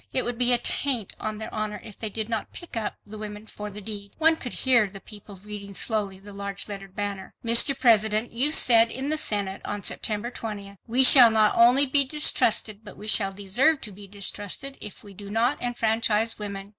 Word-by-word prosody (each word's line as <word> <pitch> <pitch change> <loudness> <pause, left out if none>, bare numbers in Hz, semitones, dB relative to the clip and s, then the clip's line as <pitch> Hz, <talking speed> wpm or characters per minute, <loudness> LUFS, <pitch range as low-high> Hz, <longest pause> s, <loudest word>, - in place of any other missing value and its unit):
It 255 - -1
would 240 -1 -4
be 250 0 +4
a 245 - +7
taint 245 -3 -1
on 215 0 -5
their 220 - -8
honor, 215 -1 -4
if 210 - -12
they 220 - -4
did 215 +1 -4
not 225 -2 -4
"pick 345 - -11
up" 220 -2 -4
the 215 +1 -11
women 210 0 -8
for 210 -1 -9
the 205 +1 -10
deed. 200 -1 -5
One 320 0 +3
could 250 -6 -8
hear 240 -5 +4
the 195 0 -11
people 205 -1 -12
reading 200 -1 -9
slowly 205 -3 -1
the 200 +1 -14
large 200 0 -7
lettered 195 -2 -10
banner: 200 -2 -5
MR. 235 +4 +5
PRESIDENT, 220 -2 +2
YOU 260 +6 0
SAID 230 -6 +6
IN 265 +4 -5
THE 310 - +1
SENATE 200 -7 -1
ON 205 -1 -6
SEPTEMBER 215 +2 -3
20 200 -4 -8
"WE 250 +3 +2
SHALL 250 -2 +9
NOT 215 -1 +2
ONLY 245 +4 +6
BE 280 +1 +4
DISTRUSTED 225 -7 +1
BUT 210 - -13
WE 210 - -10
SHALL 195 -3 +4
DESERVE 225 +11 0
TO 210 - -8
BE 200 +1 -13
DISTRUSTED 205 +6 -5
IF 210 - -9
WE 200 -1 -14
DO 200 +1 -11
NOT 235 +6 -1
ENFRANCHISE 225 -2 0
WOMEN." 200 -1 -7
215 Hz, 210 wpm, -24 LUFS, 205-240 Hz, -, SHALL